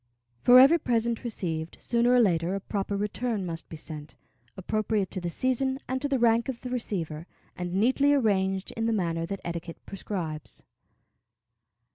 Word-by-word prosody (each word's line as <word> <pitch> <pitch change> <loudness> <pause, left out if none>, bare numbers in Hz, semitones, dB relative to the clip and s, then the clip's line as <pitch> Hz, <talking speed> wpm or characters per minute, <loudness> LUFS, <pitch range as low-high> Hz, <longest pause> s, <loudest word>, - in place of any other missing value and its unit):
For 250 +1 +8
every 290 +6 +7
present 235 -3 0
received, 170 -8 -4
sooner 235 +1 +2
or 250 - +6
later, 180 -4 +2
a - - -2
proper 200 0 -3
return 210 0 -2
must 165 -1 -6
be - - -7
sent, 155 -1 -9 0.4
appropriate 210 0 -1
to 185 - -2
the 175 - -2
season 260 +6 0
and 260 +1 -2
to 285 - 0
the 275 - +2
rank 235 0 +3
of 245 -3 -4
the 250 - -6
receiver, 170 -9 -3 0.3
and 180 0 -4
neatly 260 +7 +3
arranged 195 -8 +1
in 225 0 -2
the 230 - +1
manner 165 -5 -1
that 195 +1 -5
etiquette 170 0 -5
prescribes. 175 -6 -5
205 Hz, 165 wpm, -27 LUFS, 175-240 Hz, 0.4 s, For